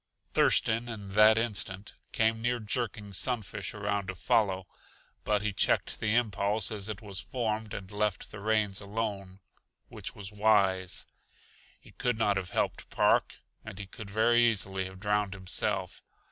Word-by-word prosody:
Thurston, 115 +2 +3
in 105 -4 -7
that 105 +2 +6
instant, 105 -3 -2 0.2
came 115 0 +1
near 120 +1 0
jerking 105 -2 -3
Sunfish 105 -3 -2
around 100 -1 -2
to 95 - -4
follow; 95 -2 +1 0.6
but 105 -1 +1
he 105 -1 -1
checked - - +1
the 110 +1 +1
impulse 105 -2 +2
as 105 -1 -2
it 110 +1 -5
was 100 -2 -4
formed 110 +4 -3
and 95 0 -7
left 105 -2 -1
the - - -8
reins 105 -1 +1
alone 100 -2 -4 0.5
which - - -6
was 100 0 -6
wise. 100 -3 +2 0.7
He - - -17
could 125 -2 -1
not 105 -2 +2
have 95 -2 -2
helped - - -2
Park, - - +2 0.2
and 110 -3 -9
he 100 - -6
could 100 +1 -10
very 115 +3 +4
easily 95 -4 +1
have 95 0 -9
drowned 105 -1 0
himself. 95 -1 -1
105 Hz, 155 wpm, -30 LUFS, 95-110 Hz, 0.7 s, that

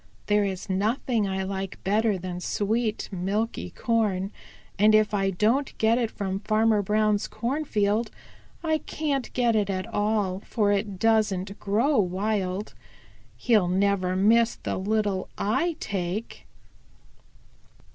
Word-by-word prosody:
"There 210 0 +3
is 190 -2 -3
nothing 215 +3 0
I 190 0 -2
like 190 0 -4
better 210 +1 +2
than 180 0 -5
sweet, 215 +4 -1
milky 200 +5 -2
corn, 210 -5 0 0.5
and 215 +1 +6
if 215 0 +3
I 195 -1 +1
don't 225 +9 0
get 225 +2 +3
it 235 -2 0
from 195 -2 -3
Farmer 215 0 +2
Brown's 210 +1 +1
cornfield, 230 -5 -1 0.5
I 315 -1 +1
can't 285 -5 -3
get 240 -2 +2
it 205 -2 +1
at 185 -1 -2
all, 205 -3 0
for 205 0 0
it 200 -1 -1
doesn't 205 -2 +1
grow 230 +8 +2
wild. 195 +1 -1 0.6
He'll 215 -7 +3
never 185 0 +1
miss 225 +4 +4
the - - -4
little 205 -1 -1
I 325 +11 0
take." 195 +2 -4
210 Hz, 125 wpm, -26 LUFS, 195-225 Hz, 0.6 s, and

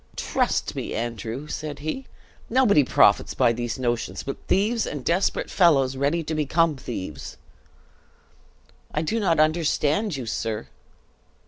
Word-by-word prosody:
"Trust - - -1
me, - - -4
Andrew," 115 +4 -4
said 150 -1 -5
he, 155 - -5 0.4
"nobody 225 - +4
profits - - +3
by 115 - +3
these 120 +1 -3
notions 120 -2 -2
but 140 - -4
thieves 215 +4 +1
and 145 -4 -5
desperate 180 +4 0
fellows 135 -8 +4
ready 145 +5 0
to 160 - -4
become 155 +1 +2
thieves!" 95 - -7 1.5
"I 150 - -1
do 225 +9 -1
not 170 -7 +2
understand 155 +3 +1
you, 130 - -5
sir!" 110 0 -3
150 Hz, 130 wpm, -24 LUFS, 125-170 Hz, 1.5 s, nobody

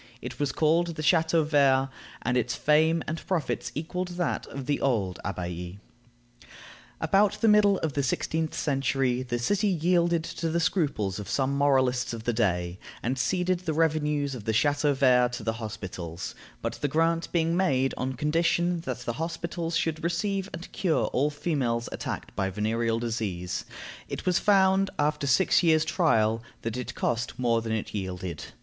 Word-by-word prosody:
It - - -8
was 145 -1 0
called 165 +2 +2
the 155 - -4
Chateau 160 0 +3
vert, 135 -3 +3 0.3
and 125 - 0
its 125 -1 0
fame 160 +2 +3
and 160 +2 -4
profits 170 -7 -1
equaled 180 +4 -3
that 175 - -1
of 135 -2 -7
the 145 +2 0
old 105 -9 0
abbaye. 90 -1 -5 1.2
About 200 +1 +3
the 225 - +2
middle 210 -2 +5
of 155 -3 -1
the 140 - 0
sixteenth 160 +4 -1
century 135 -3 0
the 120 -1 -2
city 200 - +1
yielded 170 -2 +2
to 165 0 -3
the 170 +2 0
scruples 140 - 0
of 105 - -7
some 135 0 0
moralists 130 -4 +2
of 115 -1 -6
the 120 - 0
day, 90 -5 0 0.2
and 125 +2 -1
ceded 180 +7 +1
the 165 -4 -3
revenues 150 -3 +1
of 115 -5 -8
the 110 - 0
Chateau 145 +3 +2
vert 125 -2 +4
to 125 -2 -5
the 110 +1 0
hospitals; 90 -6 -6 0.3
but - - -1
the 145 - +1
grant 165 +3 +1
being 165 -1 +1
made 135 -8 +2
on 130 +1 -2
condition 170 +5 +1
that 125 -2 -4
the 120 - -3
hospitals 170 0 -2
should 160 0 -1
receive 190 +3 -1
and 170 +2 -8
cure 175 -5 +1
all 140 +4 +2
females 135 -6 -1
attacked - - -5
by 95 -1 0
venereal 115 +3 0
disease, 105 -7 -3 0.4
it - - -5
was 180 -1 +3
found, 195 -1 +4
after 150 -1 0
six 135 +9 +4
years' 160 -2 +4
trial, 115 - +2 0.2
that 115 0 -3
it 125 -1 -5
cost 120 0 -1
more 115 -2 +2
than 110 0 -4
it 110 -1 -3
yielded. 95 -4 -4
145 Hz, 170 wpm, -27 LUFS, 115-165 Hz, 1.2 s, middle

